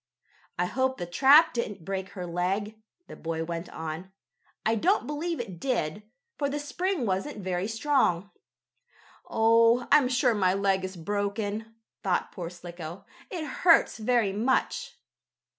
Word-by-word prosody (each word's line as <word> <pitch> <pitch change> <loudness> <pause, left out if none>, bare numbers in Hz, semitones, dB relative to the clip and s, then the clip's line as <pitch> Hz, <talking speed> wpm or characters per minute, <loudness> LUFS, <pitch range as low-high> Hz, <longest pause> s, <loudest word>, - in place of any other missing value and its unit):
"I 180 - +1
hope 260 +6 0
the 175 - -4
trap 275 - +6
didn't 205 -8 -4
break 190 0 -3
her 180 -3 -5
leg," 190 +5 -1 0.3
the - - -10
boy 165 0 -3
went 170 +1 -5
on. 160 +4 -6 0.5
"I 225 - +3
don't 355 - +2
believe 310 +4 -3
it 190 -8 -6
did, 210 - -1 0.4
for 285 -2 +1
the 285 - -2
spring 345 +1 -2
wasn't 195 +8 -2
very 185 +1 -1
strong." 225 -6 +1 1.0
"Oh, 230 +2 +4
I'm 290 -3 +6
sure 255 -1 +3
my 190 -3 +2
leg 195 -1 +1
is 185 -1 -5
broken," 205 +4 -3 0.3
thought 185 -2 0
poor 170 -2 -6
Slicko. 175 0 -9 0.2
"It 340 -5 -4
hurts 325 -2 +3
very 220 -3 +2
much." 260 - 0
205 Hz, 140 wpm, -28 LUFS, 180-260 Hz, 1.0 s, trap